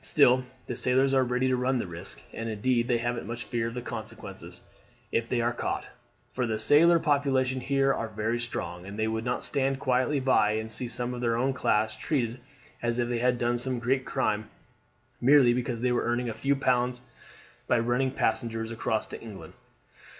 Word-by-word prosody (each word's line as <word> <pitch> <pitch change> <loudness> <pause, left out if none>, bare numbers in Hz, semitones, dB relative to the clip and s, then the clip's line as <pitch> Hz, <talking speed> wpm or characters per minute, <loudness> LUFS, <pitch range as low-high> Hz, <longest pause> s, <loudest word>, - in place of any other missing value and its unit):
Still 130 -3 +5 0.2
the - - -4
sailors 130 +2 +3
are 130 -1 +4
ready 125 +1 0
to 130 - +2
run 125 +1 +1
the 120 - -2
risk, 85 -9 -6
and 115 0 -4
indeed 120 +2 +1
they 120 -2 +2
haven't 120 +1 -3
much 120 0 -5
fear 115 +1 -2
of 115 - -6
the 125 - -4
consequences 110 -2 -8 0.5
if 115 0 0
they 120 -2 +1
are 120 +1 +1
caught, - - -3 0.5
for 125 0 -1
the 110 -1 -1
sailor 150 +10 +5
population 135 -4 +1
here 135 +1 +2
are 115 - -3
very 110 +2 -2
strong, 90 -7 -4
and 100 +1 -7
they 110 0 0
would 110 0 -2
not 125 0 -1
stand 135 -1 0
quietly 130 +2 +1
by 130 -5 +3
and 110 +1 -3
see 115 +3 -3
some 120 +1 -2
of 125 - -5
their 115 -1 +1
own 130 +3 +1
class 110 -3 +1
treated 125 -5 -1 0.4
as 120 0 0
if 120 -1 0
they 120 -1 -1
had 125 +1 +2
done 120 0 0
some 130 +1 -1
great 130 +3 0
crime 110 -6 -1 0.7
merely 130 -1 +6
because 120 -1 -2
they 125 0 +2
were 120 - +1
earning 120 0 0
a - - -3
few 135 +6 0
pounds 125 -2 0 0.6
by - - +3
running 120 +3 +1
passengers 115 -3 -1
across 110 -1 -1
to - - -9
England. 110 -4 -10
120 Hz, 200 wpm, -28 LUFS, 115-130 Hz, 0.7 s, merely